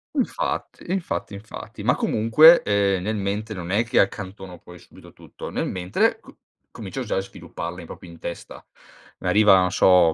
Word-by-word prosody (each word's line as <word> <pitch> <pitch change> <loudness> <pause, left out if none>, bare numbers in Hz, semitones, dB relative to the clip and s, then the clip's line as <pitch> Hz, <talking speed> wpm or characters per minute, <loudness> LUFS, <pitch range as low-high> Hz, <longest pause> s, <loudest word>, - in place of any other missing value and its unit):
Infatti, - - -3
infatti, 185 - -3
infatti, 100 +2 -9
ma - - +2
comunque, 155 +10 +6
ehm, 100 -2 +1
nella 110 +3 -2
mente 105 +2 -3
non 90 0 -6
è 105 +4 +2
che 115 - +1
accantono 95 -2 -2
poi 90 +1 -14
subito - - -17
tutto, - - -10
nel - - -2
mentre 90 0 0
c - - -17 0.4
comincio 110 +5 -7
già 120 - -3
a - - +1
svilupparla 95 - -7
proprio 85 - -11
in 85 - -14
testa. 85 - -8 0.6
Arriva, 105 -2 +5
non 90 -1 +1
so, 90 -3 +5
100 Hz, 165 wpm, -23 LUFS, 90-110 Hz, 0.6 s, comunque